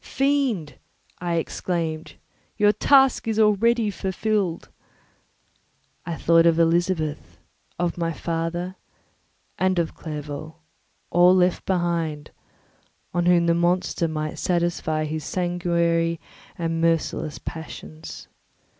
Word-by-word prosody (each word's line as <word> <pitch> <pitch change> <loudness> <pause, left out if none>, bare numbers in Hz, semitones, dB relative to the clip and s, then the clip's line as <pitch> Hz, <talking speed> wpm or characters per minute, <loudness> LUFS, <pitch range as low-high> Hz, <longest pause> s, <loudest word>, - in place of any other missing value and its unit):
"Fiend," 265 - 0 0.4
I 175 -1 -1
exclaimed, 165 -1 -3 0.4
"your 205 -1 +5
task 270 +1 +4
is 220 -1 0
already 220 +1 +3
fulfilled!" 195 -2 -1 1.4
I 170 - -2
thought 165 +1 +4
of 165 -1 +4
Elizabeth, 165 -2 0 0.4
of 175 0 -1
my 165 -1 0
father, 170 +3 -3 0.8
and 185 0 +2
of 170 -2 0
Clerval—all 155 +4 -1
left 180 -1 +2
behind, 170 -5 -1 0.8
on 175 0 +1
whom 175 -1 +5
the 170 - +3
monster 175 0 +1
might 155 -1 -4
satisfy 170 -3 0
his 155 0 -4
sanguinary 170 -2 0 0.4
and 165 -1 -1
merciless 165 -2 0
passions. 160 0 -8
170 Hz, 100 wpm, -24 LUFS, 165-185 Hz, 1.4 s, your